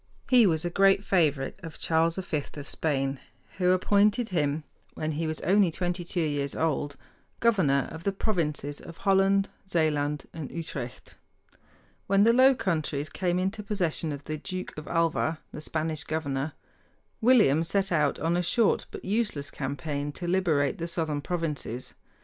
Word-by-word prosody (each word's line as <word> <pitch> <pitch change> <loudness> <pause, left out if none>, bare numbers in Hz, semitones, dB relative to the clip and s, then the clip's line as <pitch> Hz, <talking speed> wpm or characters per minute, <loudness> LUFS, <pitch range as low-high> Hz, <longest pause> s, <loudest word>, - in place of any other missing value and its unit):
He 245 -4 +7
was 160 -2 +1
a 175 - -1
great 195 +1 +4
favorite 155 -6 +1
of 165 -3 -8
Charles 165 +1 +2
V 180 -5 -2
of 145 -2 -7
Spain, 135 -3 -1 0.4
who 180 -1 +3
appointed 205 +5 +3
him, 150 -4 0 0.3
when 155 0 -2
he 160 +2 -2
was 155 0 -2
only 195 0 +4
twenty 175 +2 -2
two 175 +1 -2
years 145 -3 -1
old, 145 -2 -1 0.4
governor 180 -13 +3
of 160 +1 -8
the 200 - +1
provinces 150 -8 -2
of 165 - -11
Holland, 195 0 +3 0.2
Zealand, 150 -4 0
and 155 -4 -6
Utrecht. 145 -7 -7 0.9
When 195 +1 +4
the 230 +2 +6
Low 260 +2 +6
Countries 155 - -1
came 180 +2 -1
into 195 +4 -1
possession 180 -6 -1
of 145 -1 -6
the 155 0 -4
Duke 185 +3 -6
of 150 - -8
Alva, 165 -1 +1
the 150 - -7
Spanish 155 0 -2
governor, 145 -2 -2 0.7
William 215 - +5
set 195 +3 0
out 150 -4 +2
on 165 +2 0
a 175 - +2
short 215 +5 +2
but - - -9
useless 205 -9 -1
campaign 145 +1 -3
to 175 - -5
liberate 170 -6 +1
the 170 - -2
southern 160 -4 -2
provinces. 150 -7 -3
165 Hz, 160 wpm, -28 LUFS, 150-190 Hz, 0.9 s, He